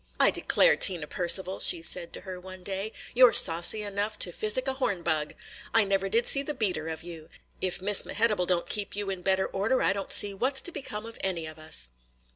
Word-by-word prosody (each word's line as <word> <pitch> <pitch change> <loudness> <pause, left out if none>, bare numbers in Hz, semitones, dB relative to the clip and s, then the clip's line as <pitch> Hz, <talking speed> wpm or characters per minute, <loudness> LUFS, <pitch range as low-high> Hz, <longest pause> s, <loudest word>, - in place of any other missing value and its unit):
"I - - +5
declare, - - +3
Tina 175 -5 +4
Percival," 185 +3 -3
she 165 -2 +3
said 170 0 +2
to - - -8
her 185 -2 -9
one 185 0 -12
day, 195 +3 -5 0.2
"you 250 +1 +7
're - - +1
saucy 170 +6 +6
enough 205 +1 -3
to 175 - -8
physic 215 +8 -2
a 265 - 0
horn 200 -10 -3
bug! 155 -2 -1 0.4
I 225 - +6
never 195 -1 -1
did 230 +4 +1
see 275 - +3
the 295 +1 -5
beater 185 -9 -2
of 160 -1 -6
you! 165 -2 -11 0.3
If 185 0 0
Miss 205 0 +4
Mehitable 210 -5 -1
don't 175 -2 -1
keep 205 -1 -2
you 205 -1 -4
in 185 -2 -6
better 190 +1 0
order, 205 +7 -1
I - - +2
don't 195 -1 -6
see 205 -1 +4
what 260 +7 -2
's - - +1
to 350 - -7
become 225 -8 -6
of 230 0 -10
any 175 -4 -2
of 155 0 -10
us!" - - -3
195 Hz, 230 wpm, -27 LUFS, 175-215 Hz, 0.4 s, you